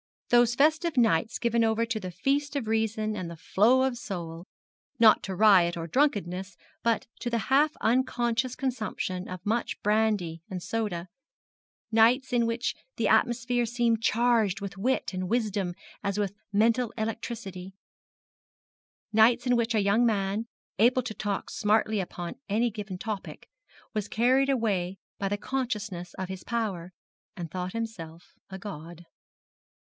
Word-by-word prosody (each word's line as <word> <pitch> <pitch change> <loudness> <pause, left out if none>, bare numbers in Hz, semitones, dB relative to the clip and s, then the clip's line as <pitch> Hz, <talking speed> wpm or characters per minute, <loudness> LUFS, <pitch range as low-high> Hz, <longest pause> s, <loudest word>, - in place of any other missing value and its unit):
Those 240 -1 +5
festive 310 +2 +2
nights 225 -3 +3
given 235 -1 +1
over 225 +1 +2
to 230 -1 -2
the 185 -3 -5
feast 280 - -1
of 275 -5 -1
reason 220 -1 0
and 185 -4 -4
the 170 - -7
flow 235 +10 +3
of 260 -3 -1
soul 170 -4 -6 0.5
not 225 -2 +6
to 190 - -5
riot 180 -4 +5
or 165 - -4
drunkenness, 190 - 0 0.2
but 230 -1 +1
to 240 - -3
the 235 - 0 0.2
half 295 +3 +4
unconscious 245 0 +1
consumption 215 -8 -3
of 185 +1 -7
much 230 +3 -1
brandy 210 -6 +1
and 180 -2 -5
soda 205 -6 -2 0.8
nights 240 +4 +4
in 235 -1 +3
which 230 +1 -1 0.2
the - - +1
atmosphere 240 0 +2
seemed 235 -1 +1
charged 225 -4 +2
with 200 -2 -6
wit 235 +2 -1
and 185 -1 -3
wisdom 205 -6 0 0.3
as 200 0 -1
with 200 -2 -1 0.2
mental 225 +3 +2
electricity 215 -4 -5 1.4
nights 230 +3 +5
in 250 -1 +3
which 235 -1 +1
a 210 - +3
young 200 +4 +3
man, 210 0 0 0.3
able 250 +3 +4
to 230 -2 -5
talk 205 -2 -3
smartly 215 0 +1
upon 175 +4 -5
any 230 +4 +1
given 205 -3 -6
topic, 210 0 -6 0.5
was 210 -2 -2
carried 255 +6 +3
away 195 -8 0 0.2
by 195 - -1
the 205 - -1
consciousness 210 -8 -4
of 190 - -4
his 190 -1 -7
power, 200 -7 -3 0.5
and 170 -3 -6
thought 180 0 -4
himself 180 -8 -6 0.2
a 190 - -7
god. 175 -3 -9
220 Hz, 150 wpm, -28 LUFS, 190-235 Hz, 1.4 s, not